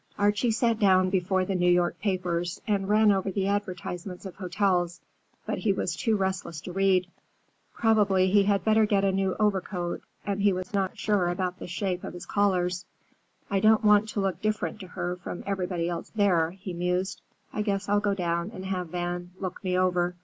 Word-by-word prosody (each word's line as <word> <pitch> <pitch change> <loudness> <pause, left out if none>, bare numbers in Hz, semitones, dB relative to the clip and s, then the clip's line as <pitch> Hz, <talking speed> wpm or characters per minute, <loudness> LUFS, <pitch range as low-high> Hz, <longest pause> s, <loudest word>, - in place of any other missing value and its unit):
Archie 205 +3 +2
sat 230 0 +1
down 185 -3 +4
before 185 0 +1
the 195 - -2
New 180 -1 +2
York 175 0 +2
papers 180 -3 -1
and 200 -2 0
ran 215 0 +5
over 195 0 0
the 190 0 -1
advertisements 185 -2 -3
of 190 - -7
hotels, 180 -2 0 0.5
but - - -2
he 215 - +2
was 180 -3 -1
too 215 +6 +1
restless 190 -4 -2
to 180 - -8
read. 190 -1 +3 0.7
Probably 200 -4 +3
he 200 0 +5
had 200 -2 +2
better 220 0 +4
get 200 -1 +2
a 195 - +3
new 190 -1 0
overcoat, 190 -4 -1 0.2
and 200 -1 -1
he 200 -1 +4
was 185 +1 -5
not 195 -2 -1
sure 205 -5 +1
about 180 +1 -2
the - - -7
shape 180 0 -2
of - - -6
his 175 - -8
collars. 180 -3 +1 0.6
"I 200 -2 +1
don't 215 +2 +4
want 210 +1 +5
to 210 - -2
look 195 -2 -1
different 215 -6 -1
to 185 - -8
her 180 0 -4
from 175 0 -7
everybody 180 -3 -1
else 175 -1 -4
there," 180 -6 +3
he 190 +1 -8
mused. 180 +2 -1 0.3
"I 215 - -1
guess 200 -2 -1
I'll 205 +1 +3
go 205 -1 0
down 170 0 -1
and 185 0 -7
have 185 -2 -2
Van 175 0 -3
look 185 -2 -5
me 180 -1 0
over. 180 -1 +1
190 Hz, 195 wpm, -27 LUFS, 180-205 Hz, 0.7 s, ran